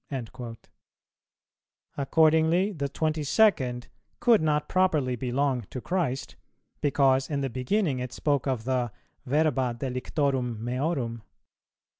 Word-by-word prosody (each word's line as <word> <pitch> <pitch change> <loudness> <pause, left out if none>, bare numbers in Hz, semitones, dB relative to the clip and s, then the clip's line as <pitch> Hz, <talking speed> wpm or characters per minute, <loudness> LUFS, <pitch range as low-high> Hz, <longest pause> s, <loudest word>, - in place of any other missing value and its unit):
"[289:2] 120 -2 -6 1.4
Accordingly 160 +6 +3
the 140 -7 -3
twenty 155 +2 -1
second 135 - +2 0.3
could 235 -6 +5
not 150 -1 +1
properly 155 -9 +2
belong 130 +1 0
to 130 - -5
Christ, 145 -4 -2 0.5
because 135 -2 +2
in 145 -2 -1
the 135 -2 -2
beginning 135 - 0
it 125 -1 -4
spoke 145 -1 0
of 130 -4 -1
the 125 -2 -1 0.4
"verba 135 -3 +1
delictorum 130 -2 -1
meorum." 125 -1 -2
135 Hz, 110 wpm, -27 LUFS, 125-155 Hz, 1.4 s, could